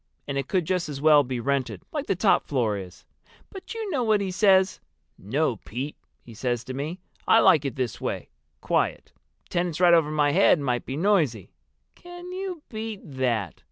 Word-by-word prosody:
And 140 - -3
it 135 -1 -2
could 185 -4 0
just 180 -2 -1
as 140 -2 -5
well 150 0 +6
be 130 -2 -3
rented, 135 +1 -2
like 295 -2 -4
the - - +1
top 195 +3 +2
floor 120 -7 0
is. 90 -2 -9 0.5
But 390 +3 -9
you 440 -3 -4
know 275 - 0
what 215 -2 +3
he 195 -2 -2
says? 190 -1 +3 0.4
'No, 130 +4 -1
Pete,' 130 +6 -6 0.3
he 115 - -13
says 120 +1 -2
to 130 - -7
me, 150 +7 -4 0.3
'I 225 - +6
like 150 -8 +5
it 140 - -3
this 130 -5 -3
way—quiet. - - -3 0.4
Tenants 175 -2 -1
right 175 -1 +6
over 165 -3 +4
my 150 -1 +2
head 145 - +5
might 125 -4 -2
be 135 - -4
noisy.' 155 - +1 0.4
Can 350 0 -11
you 370 -4 -5
beat 220 -2 -6
that? 125 - -2
150 Hz, 185 wpm, -25 LUFS, 130-195 Hz, 0.5 s, well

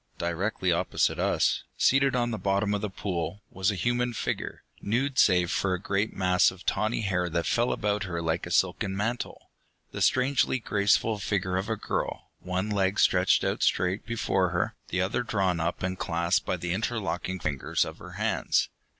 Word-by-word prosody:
Directly 90 +2 -1
opposite 85 - +1
us, - - +2 0.2
seated 135 0 +3
on 120 -1 +1
the 110 - -3
bottom 100 +1 +1
of 105 - -1
the 105 - -2
pool, 95 0 -4
was 95 +1 0
a 105 - -1
human 120 +5 0
figure, - - -4 0.2
nude 130 +5 0
save 90 -3 +4
for 95 -2 +1
a - - -6
great 100 +3 -1
mass 90 -1 +4
of 95 0 -12
tawny 110 +4 0
hair 90 -4 0
that 85 0 -1
fell 120 +1 +1
about 105 0 0
her 85 -2 -3
like 80 +1 -1
a - - -7
silken 95 +2 +1
mantle. 115 +4 -3 0.4
The - - -5
strangely 130 +1 +3
graceful 105 -1 +1
figure 95 -2 -1
of 95 +3 -2
a 110 - +1
girl, 105 - -4
one 95 +3 -2
leg 100 -1 +1
stretched 90 0 +4
out - - -1
straight 95 +3 +1
before 95 -5 +1
her, 85 0 -1
the 90 - -1
other 95 +6 0
drawn 95 -7 0
up 85 +2 -2
and 95 0 -2
clasped 85 +1 0
by 90 - 0
the 85 0 -2
interlocked 95 -5 -2
fingers 70 -4 0
of - - -9
her - - -10
hands. - - +1
95 Hz, 185 wpm, -27 LUFS, 90-110 Hz, 0.4 s, save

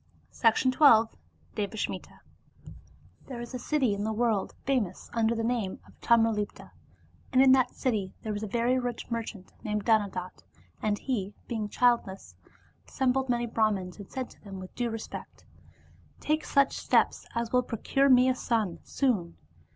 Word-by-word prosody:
Devasmitd 255 +3 +2
From 230 -7 +7 0.4
the 210 0 -3
Sanskrit - - -3 1.2
T^HERE 245 -3 -6
is 240 - -10
a 255 - -4
city 260 -3 +1
in 200 0 -3
the 220 - -1
world 220 -3 0
famous 255 -9 -1
under 230 0 +2
the 225 - -2
name 225 -5 -1
of - - -18
Tamralipta, 225 -3 +1 0.6
and 255 - +3
in 265 0 +7
that 260 -1 +3
city 210 -7 -1
there 215 - -2
was 205 - -4
a 215 - -3
very 240 +4 +1
rich 245 -1 -5
mer 230 0 0
chant 200 -4 -10
named 210 -1 -2
Dhanadatta. 200 -5 0 0.4
And 210 -1 0
he, 205 -6 -3
being 220 -3 -3
childless, 235 -5 +1 0.5
assem 260 -2 +1
bled 265 0 -1
many 240 -1 +1
Brahmans 215 -5 -1
and 200 - -10
said 260 -2 -4
to - - -19
them 195 -2 -8
with 185 0 -10
due 240 -1 -1
respect, 225 -1 -8 0.4
*' - - -29
Take 305 0 +2
such 280 -1 +3
steps - - +1
as 235 -1 -2
will 250 - +5
procure 270 +4 +1
me 250 0 +6
a 260 - +4
son 225 -8 -1
soon." 205 -11 -1
230 Hz, 170 wpm, -28 LUFS, 210-250 Hz, 1.2 s, From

